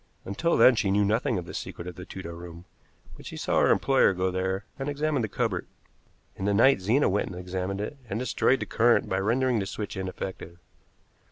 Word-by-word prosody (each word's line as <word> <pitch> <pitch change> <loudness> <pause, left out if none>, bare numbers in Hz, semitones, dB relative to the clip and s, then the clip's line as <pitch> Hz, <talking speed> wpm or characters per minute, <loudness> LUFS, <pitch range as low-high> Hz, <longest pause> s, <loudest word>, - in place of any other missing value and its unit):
Until 165 - 0
then 130 - +7
she 105 - 0
knew 100 +1 +3
nothing 110 +2 +1
of 90 - -4
the - - -9
secret 85 - -6
of 90 - -6
the 90 +1 -9
Tudor 90 -4 -8
room, 85 0 -10 0.5
but - - -12
she - - -7
saw - - +1
her - - +4
employer 135 -7 +4
go 90 +1 0
there 95 +2 -2
and 135 +2 -2
examine 145 -1 0
the 110 - -1
cupboard. 105 -4 -2 0.7
In 95 - -5
the 100 0 +2
night 115 0 +5
Zena 115 +10 +3
went 100 +2 0
and 95 - -7
examined 90 +2 -4
it, 125 +8 -5
and 100 - -2
destroyed 130 +2 +1
the - - -1
current 120 +1 +3
by 95 - 0
rendering 120 +4 +1
the 95 - -3
switch 105 0 -5
ineffective. 95 -2 -6
100 Hz, 210 wpm, -27 LUFS, 95-120 Hz, 0.7 s, then